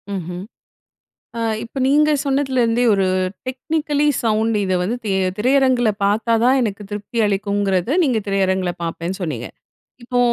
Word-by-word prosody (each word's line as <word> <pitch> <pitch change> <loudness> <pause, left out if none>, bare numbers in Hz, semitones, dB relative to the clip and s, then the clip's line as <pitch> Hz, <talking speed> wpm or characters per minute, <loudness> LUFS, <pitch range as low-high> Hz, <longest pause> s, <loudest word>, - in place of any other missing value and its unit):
ம்ஹ்ம். 180 0 -5 1.0
அ - - -2 0.2
இப்ப 235 +4 -7
நீங்க 300 +2 +4
சொன்னதுலேருந்தே, 260 -4 +1
ஒரு 195 -1 +1 0.4
டெக்னிக்கலி 295 +3 -1 0.2
சவுண்ட் 220 0 +1
இத 185 -1 0
வந்து, 225 +7 -1
தியே 195 -2 0 0.2
திரையரங்குல 255 -1 +3
பாத்தா 220 +3 +2
தான் 260 +2 +4
எனக்கு 210 -3 -2
திருப்தி 210 +3 -5
அளிக்குங்கிறத, 200 -1 0
நீங்க 255 -6 +1
திரையரங்குல 190 -2 +1
பாப்பேன்னு 170 +2 -4
சொன்னீங்க. 130 -8 -4 0.5
இப்போ, 245 +1 -2
220 Hz, 130 wpm, -20 LUFS, 195-255 Hz, 1.0 s, நீங்க